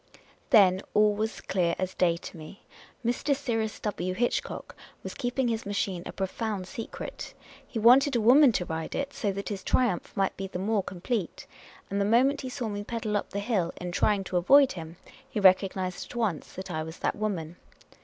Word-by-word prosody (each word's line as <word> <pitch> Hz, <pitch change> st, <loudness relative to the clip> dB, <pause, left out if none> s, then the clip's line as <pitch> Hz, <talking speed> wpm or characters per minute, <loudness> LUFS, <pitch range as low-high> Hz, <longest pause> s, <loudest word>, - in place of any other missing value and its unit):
Then 195 Hz, -7 st, +6 dB
all 210 Hz, 0 st, +5 dB
was 220 Hz, +2 st, -3 dB
clear 175 Hz, -3 st, 0 dB
as 185 Hz, 0 st, -2 dB
day 170 Hz, -2 st, +2 dB
to 175 Hz, -, -10 dB
me. 160 Hz, +4 st, -11 dB, 0.4 s
Mr. 245 Hz, +4 st, +1 dB
Cyrus 225 Hz, -6 st, -2 dB
W. 185 Hz, -3 st, -2 dB
Hitch 240 Hz, +5 st, +1 dB
cock -, -, -8 dB, 0.3 s
was -, -, -6 dB
keeping 245 Hz, +1 st, -1 dB
his 225 Hz, -1 st, -1 dB
machine 200 Hz, -3 st, -2 dB
a -, -, -5 dB
profound 195 Hz, 0 st, -3 dB
secret; 225 Hz, +3 st, -7 dB, 0.3 s
he -, -, -6 dB
wanted 255 Hz, +5 st, +6 dB
a -, -, +3 dB
woman 255 Hz, +5 st, +7 dB
to 180 Hz, -, 0 dB
ride 160 Hz, -1 st, -4 dB
it, 280 Hz, 0 st, -3 dB
so 205 Hz, -, -1 dB
that 200 Hz, +1 st, -5 dB
his 195 Hz, -3 st, -5 dB
triumph 235 Hz, -8 st, +1 dB
might 195 Hz, -1 st, +1 dB
be 195 Hz, -, -5 dB
the 185 Hz, -, -6 dB
more 205 Hz, +2 st, +1 dB
com 180 Hz, -2 st, -9 dB
plete; 215 Hz, -5 st, -2 dB, 0.5 s
and 200 Hz, 0 st, 0 dB
the -, -, +2 dB
moment 260 Hz, +7 st, +3 dB
he 260 Hz, -, -5 dB
saw 250 Hz, -2 st, -4 dB
me 205 Hz, -1 st, -4 dB
pedal 220 Hz, -1 st, -3 dB
up 205 Hz, -, -1 dB
the -, -, -5 dB
hill, 200 Hz, -5 st, 0 dB
in 180 Hz, 0 st, -4 dB
trying 200 Hz, +2 st, +2 dB
to 185 Hz, -, -2 dB
avoid 270 Hz, +10 st, +6 dB
him, 165 Hz, -1 st, -8 dB, 0.3 s
he 215 Hz, -, -2 dB
recognised 185 Hz, -1 st, +2 dB
at -, -, -11 dB
once 220 Hz, -9 st, -2 dB
that 190 Hz, 0 st, -7 dB
I 155 Hz, -2 st, -2 dB
was 160 Hz, +2 st, -7 dB
that -, -, -1 dB
woman. 180 Hz, -6 st, -3 dB
205 Hz, 205 wpm, -28 LUFS, 185-235 Hz, 0.5 s, woman